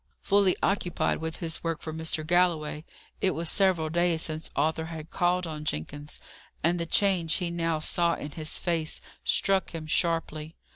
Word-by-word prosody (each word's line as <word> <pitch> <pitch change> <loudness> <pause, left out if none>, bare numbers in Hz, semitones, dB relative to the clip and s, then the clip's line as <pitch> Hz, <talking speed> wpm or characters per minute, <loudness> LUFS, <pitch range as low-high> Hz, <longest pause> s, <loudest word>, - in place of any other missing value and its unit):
Fully 200 -2 +4
occupied 195 -3 +1
with 160 0 -3
his 165 -1 -2
work 165 -2 -1
for 155 - -5
Mr. 160 -1 -2
Galloway, 165 -3 +1 0.4
it 185 - +2
was 165 0 +1
several 185 -5 +3
days 170 0 +2
since 155 -1 -3
Arthur 160 +2 +1
had 160 -1 -8
called 180 0 +1
on 155 -2 -5
Jenkins, 145 - -4 0.4
and 170 +2 +2
the 170 - -2
change 175 -5 +3
he 175 -1 -1
now 165 -1 0
saw 170 +2 +1
in 145 - -7
his 155 +1 -1
face 165 -3 -1 0.2
struck 195 -2 +2
him 160 -1 -5
sharply. 160 -1 0
165 Hz, 165 wpm, -28 LUFS, 155-175 Hz, 0.4 s, Fully